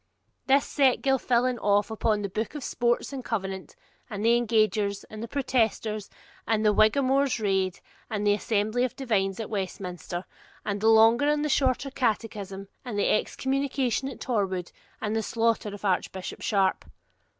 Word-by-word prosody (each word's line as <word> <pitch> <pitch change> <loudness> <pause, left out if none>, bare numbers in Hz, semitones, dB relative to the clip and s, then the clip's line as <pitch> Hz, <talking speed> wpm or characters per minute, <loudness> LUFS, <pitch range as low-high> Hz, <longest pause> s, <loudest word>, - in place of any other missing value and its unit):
This 275 +1 +4
set 270 -4 +2
Gilfillan 255 -2 +2
off 205 +1 +2
upon 215 -1 0
the - - -1
Book 220 +8 -3
of 295 - -5
Sports 240 +3 0
and 265 -2 -5
the - - -11
Covenant, 195 -4 -4 0.3
and 210 -1 -4
the 235 +1 +5
Engagers, 215 -4 +1
and 215 0 -7
the 230 - -4
Protesters, 225 -5 -1 0.4
and 220 -1 +1
the 210 - +5
Whiggamore's 265 +4 +3
Raid, 195 -3 0 0.3
and 210 -1 -2
the 205 - +5
Assembly 215 +3 0
of 255 - -2
Divines 200 -7 0
at 220 - -3
Westminster, 185 -3 -4 0.4
and 205 -1 -2
the 220 - +4
Longer 225 +5 +6
and 300 0 +1
Shorter 270 0 +1
Catechism, 210 -6 -2 0.2
and 240 -5 -5
the 205 - +2
Excommunication 265 +2 0
at 270 - -9
Torwood, 190 -7 -1 0.3
and 215 0 -2
the 225 - +1
slaughter 230 -1 0
of 205 +1 -8
Archbishop 190 0 -2
Sharp. 195 -3 +1
220 Hz, 160 wpm, -27 LUFS, 205-250 Hz, 0.4 s, Longer